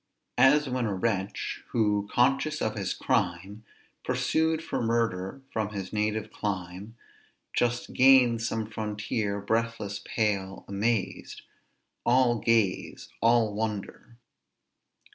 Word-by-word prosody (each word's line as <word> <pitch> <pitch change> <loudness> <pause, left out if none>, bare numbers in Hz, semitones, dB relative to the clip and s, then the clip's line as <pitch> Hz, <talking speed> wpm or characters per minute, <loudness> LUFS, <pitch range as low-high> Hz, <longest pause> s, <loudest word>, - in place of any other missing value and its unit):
"As 145 +2 +5
when 125 -2 -1
a 100 - -2
wretch, 100 -1 -2
who, 105 -3 +1
conscious 135 +5 +2
of 110 - -1
his 100 -3 -3
crime, 100 -3 -1 0.4
Pursued 160 0 0
for - - -3
murder 115 -1 -1
from 110 -2 -1
his 95 -1 -5
native 105 0 -1
clime, 95 +2 -5 0.6
Just 120 0 0
gains 125 -3 +5
some 110 -1 -2
frontier, 105 -1 -3
breathless, 115 -1 -2
pale, 100 -4 -2
amazed; 105 +2 -2 0.6
All 120 -1 +3
gaze, 110 -5 0
all 115 -2 +3
wonder!" 110 +2 -5
110 Hz, 105 wpm, -28 LUFS, 100-120 Hz, 0.6 s, As